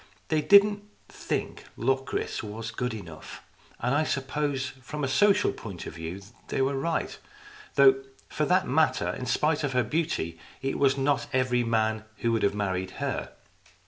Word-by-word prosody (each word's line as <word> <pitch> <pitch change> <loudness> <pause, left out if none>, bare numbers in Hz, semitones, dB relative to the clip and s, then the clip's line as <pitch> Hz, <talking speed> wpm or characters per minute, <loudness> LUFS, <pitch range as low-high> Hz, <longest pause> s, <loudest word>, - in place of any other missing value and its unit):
They 155 -1 +2
didn't 205 +4 +6 0.3
think - - -4
Locris 135 +1 -1
was 110 +1 -6
good 125 -2 -2
enough, 80 -7 -10 0.4
and 125 +2 0
I 145 +2 +3
suppose 140 -1 -1
from 150 +3 -5
a - - +1
social 205 +9 +4
point 95 -6 -8
of - - -7
view 80 +4 -6 0.2
they - - -2
were 135 +1 +2
right, 155 +4 -2 0.6
though, 135 -1 +6 0.2
for 150 - -1
that 180 +4 +2
matter, 155 +5 +2
in 125 - -4
spite 150 +4 +1
of 140 -2 -1
her 125 -1 +3
beauty, 120 - -2 0.2
it 135 0 -2
was 140 -1 +4
not 135 -3 +1
every 130 -2 +2
man 110 -2 +1
who 115 - 0
would 115 -1 +1
have 100 - +2
married 95 -2 -2
her. - - -3
135 Hz, 165 wpm, -27 LUFS, 110-150 Hz, 0.6 s, didn't